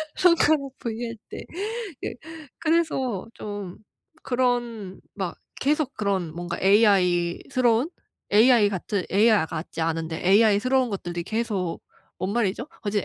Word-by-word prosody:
손가락 315 Hz, -6 st, +3 dB
V 235 Hz, -1 st, -4 dB
할 230 Hz, -1 st, -7 dB
때. -, -, -7 dB, 0.6 s
예. -, -, -3 dB, 0.4 s
그래서 310 Hz, -, 0 dB
좀 205 Hz, -3 st, -6 dB, 0.5 s
그런 240 Hz, -6 st, -1 dB
막 190 Hz, -3 st, -4 dB, 0.2 s
계속 290 Hz, -1 st, +1 dB
그런 195 Hz, -6 st, -1 dB
뭔가 175 Hz, 0 st, -4 dB
AI스러운, 205 Hz, -, +3 dB, 0.4 s
AI 220 Hz, 0 st, +6 dB
같은 200 Hz, 0 st, -2 dB
AI 210 Hz, +4 st, +5 dB
아 160 Hz, -, 0 dB
같지 165 Hz, 0 st, -6 dB
않은데 160 Hz, 0 st, -2 dB
AI스러운 225 Hz, +6 st, +4 dB
것들이 175 Hz, -3 st, -4 dB
계속 205 Hz, -3 st, -2 dB, 0.4 s
뭔 190 Hz, +2 st, -2 dB
말이죠? 230 Hz, +1 st, 0 dB, 0.2 s
어. 205 Hz, -, -2 dB
제 205 Hz, -1 st, 0 dB
210 Hz, 245 characters per minute, -25 LUFS, 185-245 Hz, 0.6 s, AI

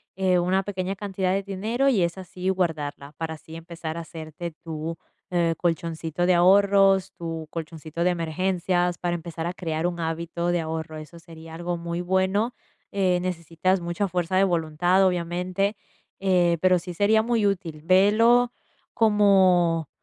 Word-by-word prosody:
eh, 185 Hz, -2 st, +2 dB
una 185 Hz, +2 st, +1 dB
pequeña 190 Hz, -1 st, -3 dB
cantidad 190 Hz, -2 st, -2 dB
de 195 Hz, 0 st, 0 dB
dinero, 220 Hz, +8 st, 0 dB
y 200 Hz, -9 st, +3 dB
esa 170 Hz, +2 st, -2 dB
sí 180 Hz, +1 st, -6 dB
guardarla, 155 Hz, -6 st, -2 dB
para 160 Hz, -1 st, -3 dB
así 160 Hz, +1 st, -12 dB
empezar 165 Hz, -1 st, -7 dB
a 170 Hz, -, -3 dB
hacerte 160 Hz, +1 st, -8 dB
tu, 165 Hz, 0 st, -5 dB, 0.3 s
eh, 170 Hz, -2 st, +1 dB
colchoncito 165 Hz, 0 st, -1 dB
de 180 Hz, -, +4 dB
ahorros, 195 Hz, +1 st, +4 dB
tu 165 Hz, -2 st, -5 dB
colchoncito 160 Hz, 0 st, -5 dB
de 180 Hz, -, +4 dB
emergencias, 175 Hz, +1 st, 0 dB
para 175 Hz, -1 st, -1 dB
empezar 165 Hz, 0 st, -5 dB
a 175 Hz, -, -3 dB
crear 165 Hz, -2 st, -3 dB
un 175 Hz, -1 st, -4 dB
hábito 170 Hz, +1 st, -3 dB
de 175 Hz, -1 st, +1 dB
ahorro, 160 Hz, 0 st, -5 dB
eso 155 Hz, +2 st, -10 dB
sería 165 Hz, -1 st, -12 dB
algo 175 Hz, +1 st, -3 dB
muy 170 Hz, 0 st, -4 dB
bueno. 190 Hz, +6 st, +1 dB, 0.4 s
Eh, 185 Hz, -3 st, +2 dB
necesitas 180 Hz, +1 st, -1 dB
mucha 175 Hz, +4 st, -2 dB
fuerza 180 Hz, +1 st, -1 dB
de 195 Hz, -, +5 dB
voluntad, 175 Hz, +2 st, +2 dB
obviamente, 180 Hz, +3 st, -1 dB, 0.5 s
eh, 175 Hz, -3 st, +3 dB
pero 185 Hz, -1 st, +4 dB
sí 180 Hz, +1 st, -7 dB
sería 210 Hz, +4 st, +3 dB
muy 230 Hz, -3 st, +1 dB
útil. 170 Hz, -6 st, -3 dB
Velo 225 Hz, +7 st, +4 dB, 0.4 s
como 185 Hz, -7 st, +4 dB
175 Hz, 155 wpm, -25 LUFS, 165-190 Hz, 0.5 s, de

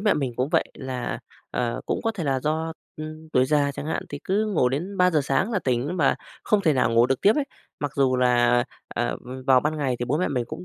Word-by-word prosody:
mẹ 210 Hz, 0 st, +3 dB
mình 135 Hz, -4 st, -1 dB
cũng 130 Hz, +3 st, 0 dB
vậy -, -, +2 dB
là, 130 Hz, -2 st, -4 dB, 0.3 s
à, 120 Hz, -1 st, -1 dB
cũng -, -, -1 dB
có 225 Hz, -, +1 dB
thể 185 Hz, -6 st, -4 dB
là 135 Hz, -2 st, +1 dB
do, 160 Hz, +2 st, -1 dB, 0.2 s
ừm, 155 Hz, +1 st, -8 dB
tuổi 130 Hz, -, +4 dB
già 145 Hz, -1 st, +2 dB
chẳng 145 Hz, +1 st, -6 dB
hạn, 160 Hz, -, -1 dB
thì 145 Hz, -, -6 dB
cứ 210 Hz, +3 st, +1 dB
ngủ 130 Hz, -9 st, +3 dB
đến 175 Hz, +10 st, -3 dB
3:00 180 Hz, -5 st, +4 dB
sáng 140 Hz, -, +1 dB
là 205 Hz, -, +2 dB
tỉnh 130 Hz, +7 st, 0 dB
mà 140 Hz, -5 st, +3 dB, 0.3 s
không 210 Hz, -, +3 dB
thể 160 Hz, -6 st, +3 dB
nào 125 Hz, -3 st, +2 dB
ngủ 115 Hz, +1 st, +6 dB
được 135 Hz, 0 st, 0 dB
tiếp 205 Hz, -, +6 dB
ấy. 295 Hz, -, +1 dB, 0.4 s
Mặc 145 Hz, -2 st, -2 dB
dù 130 Hz, -2 st, +3 dB
là, 125 Hz, -1 st, +4 dB
à, 120 Hz, -, +1 dB, 0.3 s
à, -, -, 0 dB
v -, -, -12 dB, 0.2 s
vào 130 Hz, -1 st, +6 dB
ban 155 Hz, +3 st, -1 dB
ngày 135 Hz, -4 st, 0 dB
thì 120 Hz, -, -1 dB
bố 135 Hz, +5 st, 0 dB
mẹ 180 Hz, -, +1 dB
mình 125 Hz, -4 st, -1 dB
cũng 180 Hz, -, -7 dB
145 Hz, 260 wpm, -25 LUFS, 130-160 Hz, 0.4 s, ngủ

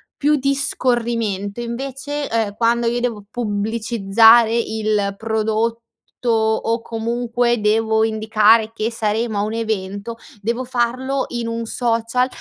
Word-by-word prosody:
più 300 Hz, +1 st, +2 dB
di 275 Hz, +1 st, +1 dB
scorrimento, 230 Hz, -6 st, -1 dB
invece, 270 Hz, +4 st, -4 dB
uhm, 220 Hz, -3 st, 0 dB
quando 235 Hz, +1 st, +1 dB
io 240 Hz, +1 st, 0 dB
devo 225 Hz, -4 st, -3 dB
pubblicizzare 225 Hz, +1 st, +3 dB
il 215 Hz, -3 st, -1 dB
prodotto, 220 Hz, +1 st, -1 dB, 0.5 s
o 225 Hz, +1 st, +1 dB
comunque, 235 Hz, +1 st, -1 dB
devo 220 Hz, +1 st, +2 dB
indicare 220 Hz, 0 st, +3 dB
che 225 Hz, +1 st, -2 dB
saremo 220 Hz, 0 st, -1 dB
a -, -, +1 dB
un 215 Hz, +1 st, -3 dB
evento, 215 Hz, -1 st, -3 dB, 0.3 s
devo 235 Hz, +4 st, -2 dB
farlo 255 Hz, +2 st, -1 dB
in 240 Hz, -1 st, -3 dB
un 230 Hz, 0 st, -3 dB
social 230 Hz, +1 st, 0 dB
230 Hz, 120 wpm, -20 LUFS, 220-240 Hz, 0.5 s, pubblicizzare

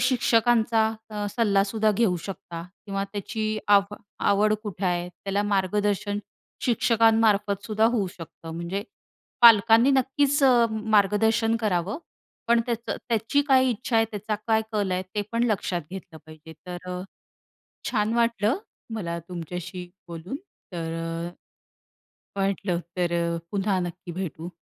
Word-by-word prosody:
शिक्षकांचा 235 Hz, -2 st, +3 dB, 0.2 s
अ, 210 Hz, -1 st, -3 dB
सल्लासुद्धा 215 Hz, 0 st, +2 dB
घेऊ 205 Hz, -3 st, +2 dB
शकता 170 Hz, -3 st, -7 dB, 0.2 s
किंवा 195 Hz, -1 st, -2 dB
त्याची 215 Hz, +2 st, -3 dB, 0.2 s
आव 200 Hz, 0 st, +4 dB, 0.4 s
आवड 210 Hz, +2 st, +3 dB
कुठे 200 Hz, -2 st, -5 dB
आहे 175 Hz, 0 st, 0 dB
त्याला 195 Hz, +2 st, -3 dB
मार्गदर्शन 205 Hz, +1 st, 0 dB, 0.5 s
शिक्षकांमार्फत 220 Hz, -4 st, +3 dB
सुद्धा 215 Hz, 0 st, +1 dB
होऊ 205 Hz, -5 st, +1 dB
शकतं. 165 Hz, -1 st, -10 dB
म्हणजे 170 Hz, +4 st, -3 dB, 0.6 s
पालकांनी 230 Hz, +3 st, +7 dB
नक्कीच 275 Hz, +2 st, +2 dB, 0.5 s
मार्गदर्शन 220 Hz, +3 st, +3 dB
करावं, 200 Hz, -, 0 dB, 0.5 s
पण 235 Hz, 0 st, +5 dB
त्याचं 235 Hz, -1 st, -2 dB
त्याची 230 Hz, +5 st, +2 dB
काय 260 Hz, -1 st, +5 dB
इच्छा 235 Hz, +1 st, -1 dB
आहे, 225 Hz, -, +5 dB
त्याचा 210 Hz, +1 st, -3 dB
काय 220 Hz, -1 st, +3 dB
कल 205 Hz, -3 st, 0 dB
आहे? 180 Hz, +1 st, 0 dB
ते 210 Hz, -, 0 dB
पण 235 Hz, +1 st, +2 dB
लक्षात 180 Hz, -4 st, -1 dB
घेतलं 185 Hz, -4 st, -9 dB
पाहिजे 155 Hz, +1 st, -12 dB
तर, 180 Hz, 0 st, -6 dB, 0.9 s
छान 215 Hz, -1 st, +1 dB
वाटलं 235 Hz, -, +2 dB, 0.4 s
मला 170 Hz, -5 st, -3 dB
तुमच्याशी 180 Hz, +1 st, -6 dB, 0.2 s
बोलून. 170 Hz, +8 st, -6 dB, 0.4 s
तर 165 Hz, -1 st, -4 dB, 1.4 s
वाटलं 195 Hz, -2 st, 0 dB, 0.2 s
तर 175 Hz, -1 st, 0 dB, 0.4 s
पुन्हा 195 Hz, -1 st, 0 dB
नक्की 175 Hz, 0 st, -5 dB
भेटू, 170 Hz, -1 st, -5 dB
205 Hz, 120 wpm, -25 LUFS, 180-225 Hz, 1.4 s, पालकांनी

